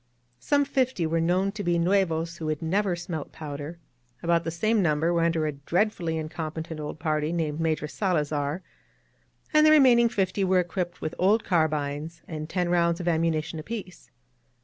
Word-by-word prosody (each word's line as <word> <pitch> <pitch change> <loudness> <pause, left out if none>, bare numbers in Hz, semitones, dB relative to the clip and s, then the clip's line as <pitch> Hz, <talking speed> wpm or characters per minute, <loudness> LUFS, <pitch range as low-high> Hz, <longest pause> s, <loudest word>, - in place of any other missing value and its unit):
Some 285 - +2
fifty 260 -9 0
were 165 +1 0
known 185 +4 +1
to 205 0 -5
be 175 -1 +1
rmevas 170 -2 +1
who 160 - -4
had 155 0 -2
never 190 +2 +1
smelt 170 -3 -5
powder, 145 +2 -7 0.5
about 170 0 +2
the - - -1
same 215 +6 +1
number 160 0 +2
were 170 - +2
under 165 -1 +1
a 155 - 0
dread 175 +10 0
fully 165 -2 -3
incompetent 160 0 -5
old 150 0 -5
party 155 -1 -1
named 160 -3 -2
Major 160 -2 0
Salazar, 150 -2 -1 0.9
and 305 0 +6
the 310 - +7
remaining 255 -6 +6
fifty 195 -3 0
were 185 -1 +3
equipped 175 0 -3
with 155 - -3
old 205 +5 +3
carbines 155 -1 -1
and 155 -1 -6
ten 180 -1 0
rounds 170 -1 +2
of 175 - -4
ammunition 160 -1 0
apiece. 195 +1 -7
170 Hz, 170 wpm, -26 LUFS, 155-185 Hz, 0.9 s, the